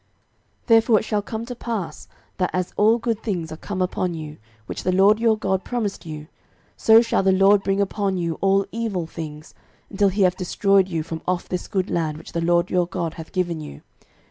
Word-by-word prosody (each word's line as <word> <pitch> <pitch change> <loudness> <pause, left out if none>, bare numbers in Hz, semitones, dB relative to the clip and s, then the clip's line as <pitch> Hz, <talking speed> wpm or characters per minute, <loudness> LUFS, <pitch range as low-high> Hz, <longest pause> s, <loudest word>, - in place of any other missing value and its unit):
06:023:015 - - -40
Therefore 225 -1 +5
it - - -6
shall 210 -2 0
come 220 +2 -5
to 245 +1 -6
pass, 225 -7 -5 0.3
that 180 -1 +1
as 185 -1 -2
all 220 +3 +4
good 230 -2 -2
things 175 -7 -3
are - - -5
come 185 +1 -3
upon 180 -1 -2
you, 155 -1 -7 0.3
which - - -6
the 185 - 0
LORD 195 +4 +5
your 225 -1 +3
God 190 -3 -1
promised 205 -8 -3
you; 155 -1 -7 0.5
so 225 +1 +6
shall 230 - +1
the 190 0 +3
LORD 195 +2 +5
bring 195 0 0
upon 200 -1 0
you 170 -2 -2
all 195 0 +3
evil 220 -7 -2
things, 155 -1 -8 0.4
until 200 0 +3
he 195 +1 +1
have 180 -1 +3
destroyed 195 +1 +2
you 165 -4 -2
from 160 0 -6
off 180 -1 -1
this 180 - -4
good 190 -2 -2
land 155 -3 -1
which - - -11
the 170 - -2
LORD 170 +1 +2
your 180 -2 +2
God 170 -3 -3
hath 160 -1 -10
given 175 -4 -1
you. 70 - -10
190 Hz, 215 wpm, -23 LUFS, 170-205 Hz, 0.5 s, so